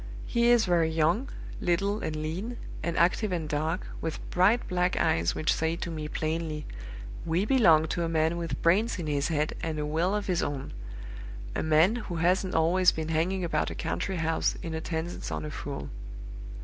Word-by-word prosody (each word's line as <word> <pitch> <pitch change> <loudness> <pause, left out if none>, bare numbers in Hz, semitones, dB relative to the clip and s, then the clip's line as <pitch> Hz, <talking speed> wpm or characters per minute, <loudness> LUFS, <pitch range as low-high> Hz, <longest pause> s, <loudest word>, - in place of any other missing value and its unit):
He 235 0 +2
is 240 -2 +5
very 170 -3 +3
young, 165 - +1 0.3
little 200 +4 +1
and 155 - -3
lean, 175 +11 -4 0.2
and 170 +1 -2
active 185 +4 +2
and 165 -4 -2
dark, 155 +5 -1 0.2
with 160 -2 -3
bright 200 +7 +3
black 180 0 +1
eyes 85 +1 +2
which 155 - +2
say 160 +1 0
to 170 0 -4
me 155 -2 -4
plainly, 155 -1 -3 0.6
'We 170 +4 +1
belong 170 -11 +5
to 170 - -1
a 165 - -1
man 160 +1 +1
with 170 -1 -3
brains 205 +8 +3
in 175 - -4
his 145 -2 0
head 155 -2 0
and 160 -2 -2
a 150 - -1
will 165 +6 +1
of 205 -1 -2
his 180 -2 0
own; 140 -2 -3 0.8
a - - 0
man 160 +8 +4
who 210 -7 -5
hasn't 180 +3 +1
always 175 +3 +4
been 160 0 -4
hanging 175 +4 0
about 170 - 0
a - - -6
country 190 - -2
house, 165 -1 0
in 165 - -4
attendance 160 +1 -4
on 75 -1 -3
a 75 - -5
fool. 70 0 -6
165 Hz, 190 wpm, -28 LUFS, 155-185 Hz, 0.8 s, is